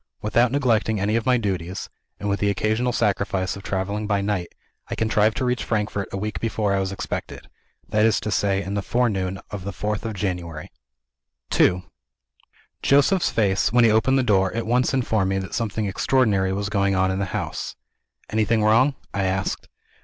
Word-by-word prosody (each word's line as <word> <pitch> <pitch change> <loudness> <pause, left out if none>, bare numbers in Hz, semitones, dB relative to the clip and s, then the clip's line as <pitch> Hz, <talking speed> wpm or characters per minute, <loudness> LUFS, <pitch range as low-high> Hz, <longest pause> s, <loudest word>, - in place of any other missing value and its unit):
Without 115 +3 +3
neglecting 115 -6 +1
any 105 +3 0
of 115 +1 -1
my 125 -1 +4
duties 95 -4 -3 0.3
(and 105 - -4
with 100 0 0
the 100 - +1
occasional 110 +5 0
sacrifice 100 -4 0
of 100 - -8
traveling 100 +2 -2
by 100 -1 +1
night), 100 -3 -1 0.4
I - - -3
contrived 110 0 +2
to 130 - 0
reach 125 0 0
Frankfort 105 -2 -1
a - - -3
week 100 -3 -3
before 110 -2 0
I 100 - +1
was 95 0 -2
expected 95 - -5 0.4
that 105 0 +2
is 110 -1 +3
to 105 - -3
say, 100 -1 +1
in 95 +3 -5
the 100 - -1
forenoon 95 -5 0
of 100 -3 -5
the 100 - -4
fourth 105 +2 -3
of 115 -2 -4
January. 90 -5 -4 0.8
II 90 0 +3 1.0
Joseph's 145 +7 +3
face, 100 -2 +1
when 120 +1 +5
he 115 - +5
opened 110 +5 +3
the 130 - +2
door, 95 -5 +2
at 115 - -2
once 125 +3 +2
informed 110 -7 +1
me 95 - 0
that 95 0 -5
something 110 -2 -1
extraordinary 100 -2 +2
was 100 +1 -2
going 100 -1 +1
on 95 0 +2
in 95 - -2
the 100 - 0
house. 90 - -4 0.6
"Anything 110 0 +2
wrong?" 125 +6 +4 0.2
I 100 -1 0
asked. 95 0 -2
105 Hz, 190 wpm, -23 LUFS, 95-115 Hz, 1.0 s, when